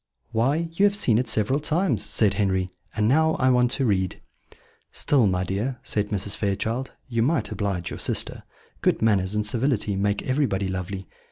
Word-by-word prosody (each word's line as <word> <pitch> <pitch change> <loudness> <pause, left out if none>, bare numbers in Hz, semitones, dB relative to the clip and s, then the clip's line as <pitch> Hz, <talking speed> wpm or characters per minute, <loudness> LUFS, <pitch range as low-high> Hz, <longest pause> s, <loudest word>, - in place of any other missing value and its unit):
"Why, 135 +9 +1
you 195 +5 +2
have 200 0 +3
seen 120 - +2
it 125 - -1
several 110 +7 +2
times," 150 - 0
said 105 -1 +2
Henry; 95 -2 0 0.2
"and 105 -1 +1
now 160 +5 +3
I 130 0 +2
want 125 -1 +3
to 135 - 0
read." 95 -5 0 0.7
"Still, 130 -7 +2
my 90 -1 0
dear," 105 +8 -2
said 105 -1 -1
Mrs. 100 -1 -2
Fairchild, 110 +5 -2 0.2
"you 115 -3 -1
might 120 -4 0
oblige 95 -5 -3
your - - -6
sister. - - +2 0.4
Good - - +1
manners 100 -3 +2
and 105 0 0
civility 115 -2 0
make 100 +1 0
everybody 130 -9 0
lovely. 95 0 -5
110 Hz, 175 wpm, -24 LUFS, 100-130 Hz, 0.7 s, have